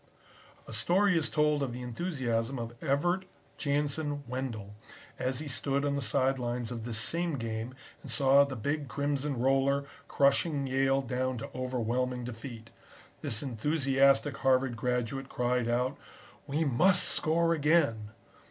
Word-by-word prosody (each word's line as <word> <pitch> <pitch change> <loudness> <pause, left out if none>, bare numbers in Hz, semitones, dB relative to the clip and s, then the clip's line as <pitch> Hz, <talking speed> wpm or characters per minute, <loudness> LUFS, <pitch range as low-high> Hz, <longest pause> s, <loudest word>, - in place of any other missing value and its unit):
A - - -8
story 180 - +3
is 160 -3 +1
told 150 -1 +2
of 130 -3 -2
the 125 +1 -6
enthusiasm 125 -3 -2
of 115 -1 -5
Evert 175 +6 +1 0.3
Jansen 145 0 -1
Wendell, 120 -5 -4 0.5
as 130 0 -1
he 155 - -4
stood 140 +1 0
on 145 - +1
the 140 - -1
side 130 +2 +1
lines 120 -1 -2
of 115 -2 -5
this 115 -2 -3
same 165 +6 -1
game 115 +1 -4 0.3
and - - -10
saw 140 0 +5
the 140 -2 -4
big 145 +5 -2
Crimson 140 -1 -1
roller 135 +2 +2 0.2
crushing 140 +1 +2
Yale 135 +1 +2
down 130 0 -2
to 115 - -7
overwhelming 125 0 -1
defeat. 115 -1 -8 0.5
This 110 - -3
enthusiastic 135 +2 +2
Harvard 130 -2 +2
graduate 125 +3 -2
cried 125 -1 0
out: 125 +2 0 0.5
"'We 150 +3 0
must 180 +8 +4
score 165 +1 +2
again!' 145 -9 +2
135 Hz, 145 wpm, -30 LUFS, 120-145 Hz, 0.5 s, saw